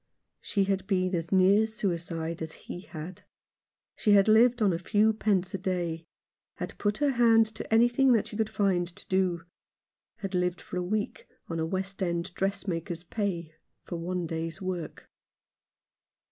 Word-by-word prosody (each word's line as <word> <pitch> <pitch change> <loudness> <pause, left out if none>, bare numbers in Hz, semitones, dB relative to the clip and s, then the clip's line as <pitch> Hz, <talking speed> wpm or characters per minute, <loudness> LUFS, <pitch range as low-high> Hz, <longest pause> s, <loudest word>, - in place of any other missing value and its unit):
She 200 - 0
had 195 -1 -1
been 185 -2 +1
as 165 -1 -2
near 195 +3 +5
suicide 170 -6 -3
as 160 0 -4
he - - -8
had. 175 +2 -8 0.7
She 210 - +3
had 200 0 +6
lived 235 +3 +5
on 205 -4 +3
a 165 - -2
few 210 +4 +3
pence 200 -3 0
a 195 - -2
day; 170 -3 -2 0.5
had - - -6
put 205 0 0
her 290 -1 +2
hand 230 -3 +5
to - - -7
anything 240 +4 +5
that 225 - +2
she - - -9
could 220 0 0
find 195 -5 +1
to 175 - -11
do; 185 -3 +1 0.7
had 195 -1 -6
lived 180 0 0
for - - -7
a - - 0
week 205 +4 -3 0.2
on 165 -1 -2
a 160 - 0
West 190 +3 -3
End 170 0 -1
dressmaker's 175 -4 -2
pay 175 -5 -3 0.3
for - - -6
one 175 +1 -2
day's 165 0 -4
work. 180 -4 -5
185 Hz, 165 wpm, -28 LUFS, 170-210 Hz, 0.7 s, had